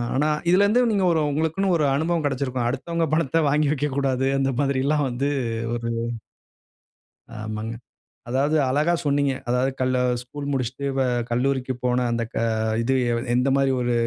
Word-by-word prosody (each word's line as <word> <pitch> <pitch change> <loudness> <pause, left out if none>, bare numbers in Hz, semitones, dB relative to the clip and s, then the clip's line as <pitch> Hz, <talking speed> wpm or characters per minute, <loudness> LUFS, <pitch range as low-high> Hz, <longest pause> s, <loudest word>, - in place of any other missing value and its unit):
ஆனா 145 +3 +2 0.2
இதில 185 +3 +5
இருந்து 220 +5 +3
நீங்க 200 -3 +1
ஒரு 160 -2 +2
உங்களுக்குன்னு 160 +6 0
ஒரு 150 - +1
அனுபவம் 160 +2 0
கிடச்சிருக்கும். 130 -3 -1
அடுத்தவங்க 165 +7 -1
பணத்த 165 0 +2
வாங்கி 150 0 +2
வைக்கக்கூடாது, 135 -2 0
அந்த 135 0 +1
மாதிரில்லாம் 140 +1 +1
வந்து 135 +4 -1 0.4
ஒரு 115 0 -3 1.5
ஆமாங்க. 110 +1 -4 0.6
அதாவது 140 +5 +1
அழகா 150 +6 +2
சொன்னீங்க. 140 -1 +2 0.2
அதாவது 125 +2 +1
கல் 130 0 +1 0.3
ஸ்கூல் 140 +3 -7
முடிச்சிட்டு 130 +1 -3
வ - - +2 0.3
கல்லூரிக்கு 130 +2 0
போன 125 0 +1
அந்த 115 0 0
க - - -14 0.5
இது 130 - +1 0.4
எந்தமாரி 135 +1 +2
ஒரு 120 0 0
135 Hz, 140 wpm, -23 LUFS, 125-150 Hz, 1.5 s, இதில